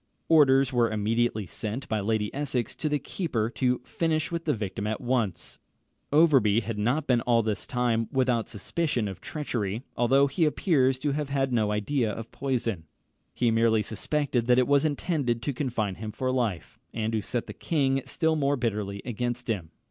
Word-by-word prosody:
Orders 135 Hz, -4 st, +5 dB
were 120 Hz, -2 st, +3 dB
immediately 110 Hz, 0 st, 0 dB
sent 110 Hz, +8 st, -5 dB
by 110 Hz, -, 0 dB
Lady 105 Hz, 0 st, -1 dB
Essex 135 Hz, -4 st, -1 dB
to 155 Hz, -, -2 dB
the 150 Hz, -, +1 dB
keeper 125 Hz, -, -2 dB
to 125 Hz, -1 st, +1 dB
finish 160 Hz, 0 st, -1 dB
with 170 Hz, -1 st, -3 dB
the 150 Hz, -, +2 dB
victim 100 Hz, -1 st, -4 dB
at 110 Hz, 0 st, -2 dB
once. 115 Hz, -9 st, -2 dB, 0.5 s
Overbury 135 Hz, -9 st, +5 dB
had 110 Hz, -1 st, -4 dB
not 125 Hz, +8 st, +1 dB
been 125 Hz, -4 st, +2 dB
all 115 Hz, -1 st, +2 dB
this 105 Hz, -1 st, -2 dB
time 120 Hz, -3 st, 0 dB
without 125 Hz, -4 st, +1 dB
suspicion 120 Hz, -, -1 dB
of 95 Hz, -2 st, -7 dB
treachery, 115 Hz, -7 st, -3 dB
although 135 Hz, +4 st, +4 dB
he 140 Hz, +4 st, +1 dB
appears 140 Hz, -5 st, +2 dB
to 145 Hz, +2 st, -1 dB
have 145 Hz, 0 st, -2 dB
had 135 Hz, -2 st, 0 dB
no 110 Hz, -3 st, +2 dB
idea 110 Hz, +3 st, 0 dB
of 115 Hz, +2 st, -7 dB
poison. 115 Hz, -10 st, -2 dB, 0.5 s
He 120 Hz, -2 st, +1 dB
merely 115 Hz, -1 st, +3 dB
suspected 125 Hz, +1 st, -1 dB
that 125 Hz, 0 st, +5 dB
it 125 Hz, -, +3 dB
was 145 Hz, +1 st, +3 dB
intended 145 Hz, -5 st, 0 dB
to 145 Hz, -, -1 dB
confine 120 Hz, -7 st, -2 dB
him 110 Hz, -1 st, -4 dB
for 130 Hz, +4 st, -2 dB
life, 115 Hz, -9 st, -2 dB
and 110 Hz, 0 st, -2 dB
to 110 Hz, -, +1 dB
set 120 Hz, +3 st, -2 dB
the -, -, -8 dB
king 135 Hz, -4 st, 0 dB
still 160 Hz, -2 st, +1 dB
more 145 Hz, -2 st, +1 dB
bitterly 105 Hz, -5 st, -2 dB
against 120 Hz, +1 st, -3 dB
him. 95 Hz, -8 st, -2 dB
120 Hz, 180 wpm, -27 LUFS, 110-140 Hz, 0.5 s, Orders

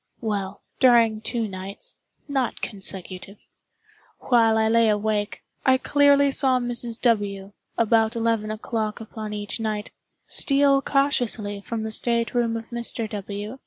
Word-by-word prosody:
Well, 205 Hz, -3 st, -3 dB, 0.2 s
during 230 Hz, -4 st, +4 dB
two 230 Hz, -1 st, -1 dB
nights 190 Hz, 0 st, -5 dB, 0.3 s
(not 270 Hz, -4 st, -1 dB
consecutive) 195 Hz, -1 st, -6 dB, 0.8 s
while 225 Hz, -3 st, +3 dB
I 220 Hz, 0 st, +3 dB
lay 230 Hz, 0 st, +4 dB
awake, 210 Hz, 0 st, -1 dB, 0.2 s
I 260 Hz, -1 st, +4 dB
clearly 285 Hz, 0 st, +4 dB
saw 265 Hz, -2 st, +2 dB
Mrs. 240 Hz, -1 st, -3 dB
W., 205 Hz, -4 st, 0 dB, 0.2 s
about 225 Hz, 0 st, +2 dB
eleven 225 Hz, -2 st, 0 dB
o'clock 215 Hz, 0 st, -3 dB
upon 220 Hz, -1 st, -7 dB
each 205 Hz, +2 st, -5 dB
night, 215 Hz, -1 st, -3 dB, 0.3 s
steal 275 Hz, -1 st, +3 dB
cautiously 245 Hz, -8 st, 0 dB
from 225 Hz, +2 st, -4 dB
the 220 Hz, -, -4 dB
state 235 Hz, 0 st, +1 dB
room 235 Hz, -2 st, +1 dB
of 225 Hz, -, -7 dB
Mr. 235 Hz, -1 st, -3 dB
W. 205 Hz, +4 st, -6 dB
225 Hz, 130 wpm, -24 LUFS, 210-240 Hz, 0.8 s, during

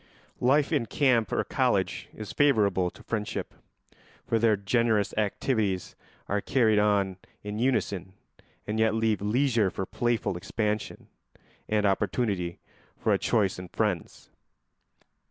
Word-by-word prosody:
Life 140 Hz, +3 st, +3 dB
in 115 Hz, -, +1 dB
camp 120 Hz, -, +2 dB
or -, -, +1 dB
college -, -, 0 dB
is 110 Hz, -2 st, -8 dB
favourable 105 Hz, -10 st, +3 dB
to -, -, -16 dB
friendship, 105 Hz, -2 st, -3 dB, 0.7 s
for 115 Hz, -, +1 dB
there 110 Hz, -2 st, +3 dB
generous 110 Hz, 0 st, +1 dB
activities 105 Hz, -2 st, -1 dB, 0.3 s
are 105 Hz, +1 st, 0 dB
carried 110 Hz, -5 st, +3 dB
on 100 Hz, -3 st, +2 dB, 0.3 s
in 105 Hz, +1 st, -5 dB
unison 100 Hz, -7 st, 0 dB, 0.5 s
and 110 Hz, +1 st, -2 dB
yet 110 Hz, 0 st, +3 dB
leave 110 Hz, -2 st, +1 dB
leisure 115 Hz, -1 st, +2 dB
for 95 Hz, -, -4 dB
playful 115 Hz, -4 st, -1 dB
expansion 105 Hz, +3 st, -3 dB, 0.6 s
and 105 Hz, -1 st, +2 dB
opportunity 95 Hz, -3 st, 0 dB, 0.4 s
for -, -, +1 dB
a -, -, +1 dB
choice 100 Hz, -5 st, +1 dB
in 90 Hz, -, -7 dB
friends. 100 Hz, -3 st, -3 dB
105 Hz, 125 wpm, -27 LUFS, 100-115 Hz, 0.7 s, Life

